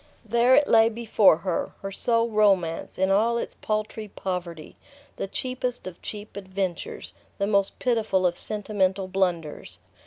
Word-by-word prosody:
There 235 +3 +4
it 295 - +4
lay 225 0 +6
before 220 -6 +4
her, 170 0 -2
her 195 - -4
sole 230 +3 +1
romance, 195 -6 +1
in 190 +1 +2
all 225 +4 +3
its - - -3
paltry 215 0 -3
poverty, 175 -5 -5 0.4
the - - -3
cheapest 250 +3 -3
of 185 -2 -8
cheap 210 0 -7
adventures, 190 -2 -4 0.2
the 200 - 0
most 200 -1 +1
pitiful 220 -6 +1
of 175 -1 +2
sentimental 195 -2 -1
blunders. 180 -5 -2
200 Hz, 145 wpm, -25 LUFS, 185-225 Hz, 0.4 s, lay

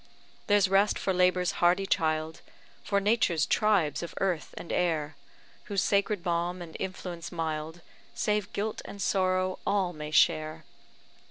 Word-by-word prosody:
There's 205 -1 +4
rest 195 +2 +3
for 190 - -1
labour's 180 0 +2
hardy 180 +3 +4
child, 160 -3 0 0.4
For 200 -1 +1
Nature's 195 -7 +2
tribes 200 -9 +2
of 170 - -7
earth 185 -5 -1
and - - -7
air, 155 -4 0 0.5
Whose 200 -2 0
sacred 200 -2 +1
balm 175 +1 -1
and 170 -2 -9
influence 180 -3 -5
mild, 160 0 -4 0.3
Save 210 -1 0
guilt 210 +2 -3
and 200 - -9
sorrow, 185 -1 +1
all 190 -3 0
may 150 -1 -6
share. 155 +1 +2
180 Hz, 140 wpm, -28 LUFS, 160-195 Hz, 0.5 s, There's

